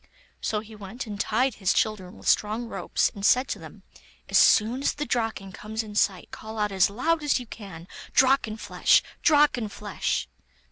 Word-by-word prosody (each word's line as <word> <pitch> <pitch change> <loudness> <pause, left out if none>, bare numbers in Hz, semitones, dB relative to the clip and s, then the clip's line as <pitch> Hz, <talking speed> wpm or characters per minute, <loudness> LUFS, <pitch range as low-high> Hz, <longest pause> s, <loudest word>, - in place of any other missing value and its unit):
So 210 -1 -1
he 220 0 -13
went 210 +5 -7
and 205 -2 -7
tied 250 +5 +1
his 190 - +2
children 205 -5 -1
with - - -10
strong 215 +3 +2
ropes, 195 -5 -1
and 200 - -9
said 250 +5 +4
to - - -3
them: - - -13 0.5
'As - - +3
soon 230 +5 +4
as - - +1
the 295 - -3
Draken 225 -6 -2
comes 220 +4 -5
in 210 -1 -10
sight, 195 -3 0
call 220 0 -9
out 210 -1 0
as 190 0 +3
loud 315 +10 0
as 295 -3 +1
you 250 - -8
can, 195 -7 -10 0.2
"Drakenflesh! 255 -5 +3 0.2
Drakenflesh!" 235 - +1
215 Hz, 175 wpm, -26 LUFS, 200-245 Hz, 0.5 s, said